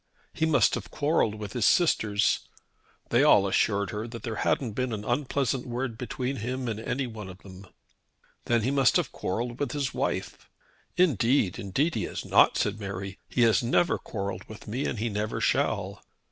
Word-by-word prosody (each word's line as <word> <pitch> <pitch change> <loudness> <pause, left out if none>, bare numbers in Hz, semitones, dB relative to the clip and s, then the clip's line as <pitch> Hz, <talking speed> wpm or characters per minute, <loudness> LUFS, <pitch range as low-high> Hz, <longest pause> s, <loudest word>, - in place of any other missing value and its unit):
He 160 - 0
must 160 - +4
have - - -3
quarrelled 145 -8 +1
with 105 -1 -7
his 120 -3 +2
sisters! 105 - +3 0.7
They - - +4
all - - +6
assured 100 -2 +1
her 105 +2 -4
that 115 -2 -9
there 115 -2 -4
hadn't 120 +1 0
been 125 +2 -2
an 105 -1 -5
unpleasant 130 0 -1
word 120 -1 -3
between 125 +3 -3
him 125 +3 -3
and 110 -2 -3
any 130 +4 -2
one 110 -5 -7
of 90 - -10
them. 95 0 -12 0.8
Then 120 -2 +2
he 130 - +1
must 135 -4 +3
have - - +1
quarrelled 120 +6 -3
with 145 - -2
his 140 -3 -2
wife! - - -3 0.5
"Indeed, 125 - +2
indeed 135 - 0
he - - -1
has - - -6
not," - - +5
said - - 0
Mary. 95 -1 -6
"He 125 - 0
has 115 -4 +5
never 130 +8 +2
quarrelled 100 -2 -5
with 110 - -12
me 125 +6 -2
and - - -3
he 110 +3 -1
never 105 +1 -2
shall." - - 0
115 Hz, 185 wpm, -27 LUFS, 105-130 Hz, 0.8 s, all